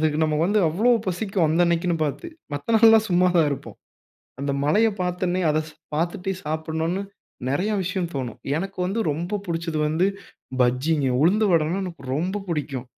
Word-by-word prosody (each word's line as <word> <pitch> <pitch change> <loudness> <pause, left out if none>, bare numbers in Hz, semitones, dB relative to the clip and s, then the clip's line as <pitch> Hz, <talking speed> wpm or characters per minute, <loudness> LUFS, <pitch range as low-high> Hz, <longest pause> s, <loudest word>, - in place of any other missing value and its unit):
அதுக்கு 155 -1 +1
நம்ம 155 -1 0
வந்து 205 +4 +2
அவ்வளோ 205 +10 +2 0.2
பசிக்கும். 190 -1 0
அந்த 160 +3 +2
அன்னைக்குன்னு 170 0 +1
பாத்து. 150 - -4 0.3
மத்த 145 +11 -2
நாள்லாம் 220 0 +6
சும்மாதான் 175 -3 +4
இருப்போம். 140 - -6 0.6
அந்த 140 0 -1
மழையை 215 +9 +3
பார்த்தன்னே 180 0 -1
அத 155 +1 +2 0.4
பாத்துட்டே 175 +4 -1
சாப்பிடணுன்னு 160 +4 -2 0.5
நெறையா 185 +11 0
விஷயம் 180 -1 -2
தோணும். 130 -5 -4 0.2
எனக்கு 195 +3 -5
வந்து 195 +5 -1
ரொம்ப 175 +8 -2
புடிச்சது 165 -2 -2
வந்து 160 +4 +1 0.6
பஜ்ஜிங்க. 135 +4 +2
உளுந்து 205 +7 +4
வடைனா 165 +2 +2
எனக்கு 170 -6 -8
ரொம்ப 185 +7 -2
புடிக்கும். 145 -6 -3
170 Hz, 150 wpm, -24 LUFS, 155-190 Hz, 0.6 s, நாள்லாம்